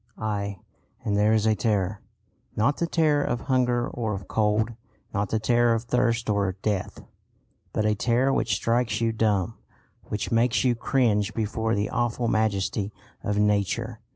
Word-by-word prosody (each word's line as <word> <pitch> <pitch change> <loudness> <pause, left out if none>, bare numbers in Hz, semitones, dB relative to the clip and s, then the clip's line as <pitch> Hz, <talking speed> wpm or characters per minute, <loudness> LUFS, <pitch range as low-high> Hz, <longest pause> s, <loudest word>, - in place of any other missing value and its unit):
Aye, 100 -2 -3 0.5
and 105 - +1
there 105 +1 +3
is 110 -1 +2
a 110 - +4
terror 100 -1 0 0.5
not 120 +7 +2
the 170 - 0
terror 155 -4 +2
of 120 - -2
hunger 125 -2 +1
or 110 -4 -3
of 95 -1 -8
cold, 110 +1 +1 0.4
not 100 -1 -1
the 110 - +1
terror 120 +1 +3
of 115 - -2
thirst 120 -1 +1
or 100 -3 +1
death, 100 -4 -2 0.7
but 110 - 0
a 105 - +3
terror 120 +5 +2
which - - +1
strikes 115 -2 0
you 115 -1 +1
dumb, 110 -1 0 0.5
which 105 - -4
makes 115 +1 +2
you 125 -2 +3
cringe 110 -4 +1
before 110 +1 -1
the 100 0 -1
awful 120 0 0
majesty 105 -2 0 0.3
of 105 -2 -1
Nature. 105 +2 0
110 Hz, 160 wpm, -26 LUFS, 105-120 Hz, 0.7 s, a